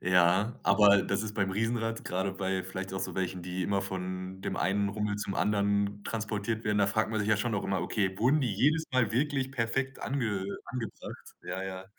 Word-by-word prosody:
Ja, 90 +5 +3
aber 100 -1 +6
das 100 +1 -1
ist 105 -1 -5
beim 100 -2 0
Riesenrad, 115 +2 -1
grade 95 +1 -1
bei 95 -1 -1
vielleicht 95 0 -5
auch 95 - -2
so - - -3
welchen, 90 -1 -2
die 90 +1 -3
immer 100 +1 +1
von 95 0 -5
dem - - -3
einen 100 +2 +1
Rummel 105 0 -1
zum 100 -2 -3
anderen 100 0 +1
transportiert 110 0 -2
werden 105 -1 +1
da 100 - +4
fragt 110 +2 +1
man 110 -1 0
sich 105 - -1
ja 110 - +4
schon 115 +2 -1
auch 100 - -1
immer: 95 - 0
„Okay, 95 -3 -1
wurden 135 +7 +4
die 120 -7 0
jedes 150 +10 +3
Mal 120 -5 +2
wirklich 135 0 0
perfekt 130 +2 -1
ange 110 -8 -1 0.2
angebracht?” 120 -4 -7
Ja, 95 +2 -4
ja. 95 0 -5
100 Hz, 205 wpm, -30 LUFS, 95-115 Hz, 0.2 s, aber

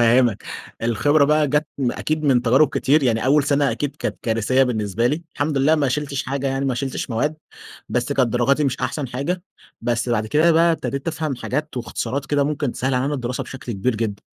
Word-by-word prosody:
هافهمك، 120 -2 +3 0.4
الخبرة 140 +6 +3
بقى 150 0 +3
جت 150 +2 +1
أكيد 155 +5 -1
من 130 -4 +3
تجارب 130 +5 +4
كتير، 150 +2 +2
يعني 115 -3 +1
أول 140 +1 +4
سنة 145 -1 +2
أكيد 145 -1 -3
كانت - - -3
كارثية 115 +3 +2
بالنسبة 115 -2 0
لي، 150 +6 -1
الحمد 145 -1 0
لله 150 +4 +4
ما 145 -3 +1
شلتش 140 +1 -2
حاجة، 135 +1 -3
يعني 135 +1 -1
ما 130 -2 0
شلتش 130 0 -3
مواد، 150 +7 0 0.5
بس 125 +3 -1
كانت 130 -3 +2
درجاتي 135 +5 +2
مش 135 - -1
أحسن 140 -5 -2
حاجة. 150 +9 -3 0.4
بس 120 0 -1
بعد 110 -2 0
كده 155 +8 +3
بقى 165 +1 +4
ابتديت 140 -1 -3
أفهم 155 -3 -2
حاجات 150 +3 -3
واختصارات 125 +2 -3
كده 145 0 +1
ممكن 145 -3 -1
تسهل 130 +1 -1
علينا 135 +4 0
الدراسة 125 -2 -3
بشكل 130 -2 -7
كبير 110 +5 -1
جدًا، 105 -3 -3
135 Hz, 195 wpm, -21 LUFS, 120-150 Hz, 0.5 s, تجارب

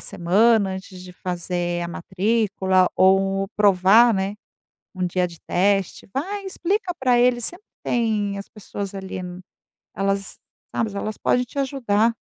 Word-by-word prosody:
semana 200 +3 +2
antes 190 -1 -8
de 180 0 -11
fazer 175 -1 -3
a 170 - -3
matrícula 190 0 +1
ou 195 +1 +3
provar, 205 +3 +5
né, 195 +1 -1 0.6
1 185 -2 -2
dia 180 +1 0
de 170 -1 -13
teste". 195 +1 0
Vai, 395 +9 -3
explica 380 0 -1
pra 250 -2 +3
eles, 240 -1 +3
sempre 355 +4 -4 0.2
tem 215 -4 0
as 200 - -8
pessoas 200 -1 -7
ali, 190 -1 -6
n 180 0 -7 0.5
elas 195 +1 -2 0.3
Tá, - - 0
mas 210 -3 -5
elas 210 +1 -4
podem 250 - +2
te 250 - -9
ajudar. 235 -5 +1
200 Hz, 145 wpm, -23 LUFS, 185-230 Hz, 0.6 s, provar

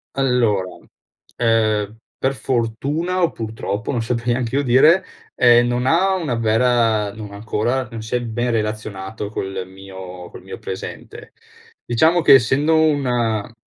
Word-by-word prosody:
Allora, 115 -9 +1 0.6
ehm, 110 -2 +1 0.2
per 135 - 0
fortuna 135 +9 -1
o 170 - +3
purtroppo, 110 0 -4
non 120 -4 -1
saprei 120 +1 -1
neanch'io 130 +3 -1
dire, 150 +9 +5 0.3
ehm, 120 0 +5
non 120 +1 -1
ha 185 +7 +3
una 160 -9 -2
vera 115 -2 +2
non 105 -1 -9
ancora, 110 +5 -2
non 115 -1 -6
si 110 +2 -4
è 125 - 0
ben 120 +1 -2
relazionato 105 -2 -3
col 95 -3 -4
mio 95 -2 -10
col - - -11
mio - - -9
presente. 95 - -8 0.5
Diciamo 160 +9 +3
che - - +7
essendo 135 +5 +4
una 125 -8 +1
115 Hz, 135 wpm, -20 LUFS, 110-130 Hz, 0.6 s, che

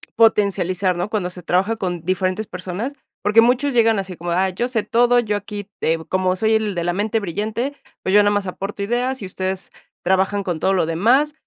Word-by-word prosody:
potencializar, 195 -4 +2
¿no? 175 +4 -2
Cuando 205 -5 -1
se 180 -1 -9
trabaja 190 +6 +1
con 175 -5 -3
diferentes 185 +3 -1
personas, 185 +8 -5 0.3
porque, 210 +2 +5
muchos 255 +4 +2
llegan 225 -3 +4
así 190 -2 -5
como, 175 +1 -5
ah, 185 +2 +2
yo 235 +7 -2
sé 225 -4 0
todo, 245 +1 +3
yo 215 -3 0
aquí 205 0 -7
te 165 +1 +2
como 185 0 +1
soy 220 +3 +2
el 215 -3 0
de 170 - -1
la 175 - +1
mente 215 +4 0
brillante, 215 - -3 0.3
pues, 190 - +1
yo 205 - +7
nomás 205 -1 +1
aporto 195 +2 -5
ideas, 245 +4 -1
y - - -4
ustedes 185 0 -3 0.3
trabajan 190 +2 +1
con 175 -4 -3
todo 190 - +2
lo 180 -3 +2
demás. 240 - +2
200 Hz, 205 wpm, -21 LUFS, 185-225 Hz, 0.3 s, yo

